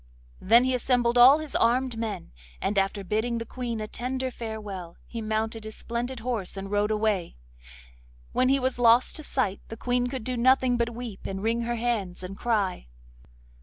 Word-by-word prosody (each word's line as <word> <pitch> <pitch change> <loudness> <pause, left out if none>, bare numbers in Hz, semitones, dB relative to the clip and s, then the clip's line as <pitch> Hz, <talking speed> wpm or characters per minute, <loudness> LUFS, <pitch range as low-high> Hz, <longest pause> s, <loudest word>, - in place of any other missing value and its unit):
Then 230 +5 +5
he 260 0 +1
assembled 245 -1 +2
all 250 +4 +8
his 310 -2 -6
armed 250 +1 +2
men, 220 - -4 0.3
and 200 0 +1
after 195 +1 -1
bidding 220 +5 -1
the 230 - -4
Queen 235 -2 -4
a 215 - -4
tender 255 +3 -3
farewell, 210 -7 -7
he 230 - -6
mounted 220 +1 -2
his 220 0 -7
splendid 235 +1 -4
horse 220 -6 -3
and 195 +1 -6
rode 205 0 +2
away. 210 -4 0 1.0
When 255 - +2
he 275 +1 +4
was 260 -1 -1
lost 235 +1 +5
to 310 - -8
sight 230 -9 -1
the 225 - -8
Queen 245 +1 0
could 255 -2 -4
do 255 +1 -2
nothing 255 +1 +4
but 235 0 0
weep, 235 -5 -7
and 195 0 -5
wring 230 +1 +1
her 240 0 -1
hands, 220 -7 -2
and 185 +2 -6
cry. 200 - -1
230 Hz, 185 wpm, -27 LUFS, 210-245 Hz, 1.0 s, all